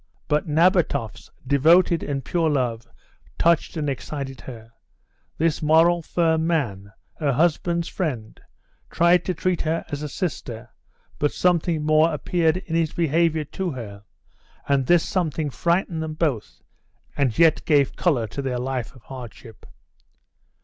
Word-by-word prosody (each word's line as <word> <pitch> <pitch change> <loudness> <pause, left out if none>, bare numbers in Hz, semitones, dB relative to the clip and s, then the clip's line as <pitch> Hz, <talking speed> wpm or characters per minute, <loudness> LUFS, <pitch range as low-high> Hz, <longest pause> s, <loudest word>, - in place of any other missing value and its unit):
But 150 +1 0
Nabatoff's 165 - +1 0.2
devoted 160 +5 +4
and 140 -2 -4
pure 165 -2 +1
love 120 -5 -1 0.5
touched 170 0 +2
and 150 -2 -2
excited 135 -1 -5
her. 115 -3 -11 0.7
This 165 0 0
moral, 165 +3 +4
firm 160 -1 0
man, 105 - -2 0.3
her 145 -3 +1
husband's 170 +3 +1
friend, 125 - -4 0.5
tried 175 +1 +3
to 185 - -2
treat 180 +1 -1
her 160 +1 -1
as 145 -1 -4
a 150 - -4
sister, 130 - -5 0.5
but 145 - +1
something 170 -3 +1
more 155 +2 +4
appeared 165 +2 0
in 175 -3 -7
his 165 -2 +1
behaviour 165 -1 +1
to 185 +5 -4
her, 105 -5 -8 0.6
and 135 -2 +1
this 175 -1 +4
something 160 -5 -1
frightened 170 +1 0
them 155 -1 -4
both, 150 -10 -2 0.5
and 130 -6 0
yet 165 -2 +4
gave 145 -4 +2
colour 140 -11 +1
to 125 +6 -6
their 130 -2 -2
life 130 0 -4
of 125 - -17
hardship. 120 -3 -11
155 Hz, 140 wpm, -23 LUFS, 135-170 Hz, 0.7 s, devoted